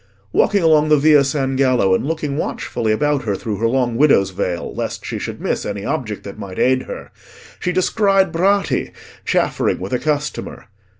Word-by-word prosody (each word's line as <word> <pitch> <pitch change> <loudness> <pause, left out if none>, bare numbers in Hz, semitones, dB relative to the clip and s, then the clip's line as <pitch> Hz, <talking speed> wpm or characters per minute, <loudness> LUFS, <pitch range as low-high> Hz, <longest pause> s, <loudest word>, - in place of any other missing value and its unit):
Walking 200 -3 +3
along 155 -2 +4
the 150 - +5
Via 145 0 +5
San 135 -1 -1
Gallo, 130 -8 +3
and - - +1
looking 155 -3 -2
watchfully 120 -6 -2
about 145 +5 +1
her 105 -3 0
through 105 +1 -4
her 115 - +1
long 120 -1 0
widow's 125 -9 +4
veil, 90 -1 -3
lest - - -4
she - - -4
should - - -6
miss - - -2
any 100 -1 -5
object 125 -9 -3
that 100 +1 -9
might 95 -3 -8
aid 130 0 +2
her, - - -8 0.5
she 180 - -1
descried 195 0 +2
Bratti 195 +4 +1 0.3
chaffering - - +1
with 95 +5 -5
a 125 - +1
customer. 150 -1 -3
135 Hz, 180 wpm, -19 LUFS, 110-155 Hz, 0.5 s, the